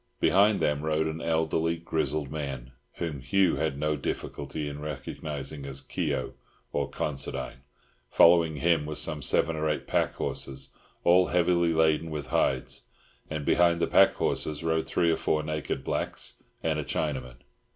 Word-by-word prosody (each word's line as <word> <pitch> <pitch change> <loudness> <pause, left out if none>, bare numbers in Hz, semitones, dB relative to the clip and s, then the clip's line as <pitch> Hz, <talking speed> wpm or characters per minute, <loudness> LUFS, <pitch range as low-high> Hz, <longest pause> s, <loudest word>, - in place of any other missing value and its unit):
Behind 100 +2 +4
them 75 -1 +1
rode 80 0 +1
an 80 +1 -3
elderly, 80 0 +1
grizzled 80 -3 -2
man, 70 -5 -5 0.2
whom 80 -5 -4
Hugh 90 +7 +2
had 80 -3 -1
no 75 +1 0
difficulty 75 0 -4
in 75 0 -6
recognising 75 0 -5
as 70 -1 -4
Keogh, - - -2 0.4
or - - -1
Considine. 70 -3 -3 0.5
Following 85 0 +5
him 80 -1 +2
were 75 - -4
some 75 0 -1
seven 80 +4 +2
or 80 0 0
eight 75 - -2
packhorses, 70 0 -1 0.3
all 90 +1 +5
heavily 85 -1 +2
laden 80 0 +2
with 75 -4 -5
hides. 65 -1 0 0.4
And 75 -2 -4
behind 85 -1 +4
the - - +2
packhorses 75 +1 +2
rode 80 0 0
three 85 -2 +2
or 80 - +1
four 75 0 0
naked 75 -1 -3
blacks - - -2 0.2
and 80 -1 0
a - - -2
Chinaman. 65 -5 -3
75 Hz, 150 wpm, -28 LUFS, 70-80 Hz, 0.5 s, Following